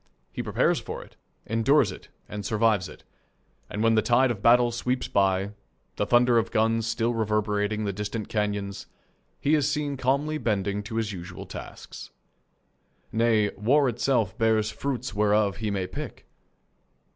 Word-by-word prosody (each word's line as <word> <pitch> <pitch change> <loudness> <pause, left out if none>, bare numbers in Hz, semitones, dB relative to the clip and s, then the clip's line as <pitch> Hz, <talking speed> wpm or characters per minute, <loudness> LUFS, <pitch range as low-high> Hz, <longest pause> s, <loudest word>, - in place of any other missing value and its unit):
He - - -4
prepares - - +1
for - - -7
it, - - -19 0.3
endures 115 +1 +3
it, - - -12 0.2
and 105 -1 -6
survives 105 -2 +1
it, - - -14 0.7
and 105 - -3
when 115 0 +4
the 110 - +4
tide 125 +2 +3
of 105 -4 -5
battle 120 +1 +5
sweeps 125 +2 -2
by, 95 0 +1 0.5
the 105 - 0
thunder 120 -1 +5
of 110 - 0
the - - -18
guns 115 +1 +2
still 115 +1 0
reverberating 105 -1 0
in - - -2
the 100 - -1
distant 105 +2 -4
canyons, 100 -2 -2 0.5
he 145 - +1
is 150 -2 +3
seen 145 -2 -2
calmly 140 +4 0
bending 100 -3 -1
to 105 +2 -7
his 110 -2 -1
usual 90 -2 -8
tasks. - - -9 1.0
Nay, 110 -2 +2
war 135 +7 +2
itself 120 -5 0
bears 110 -1 +2
fruits 130 -3 -3
whereof 105 -1 +2
he 110 0 -2
may 100 -2 -1
pick. 90 - -7
110 Hz, 160 wpm, -26 LUFS, 105-120 Hz, 1.0 s, battle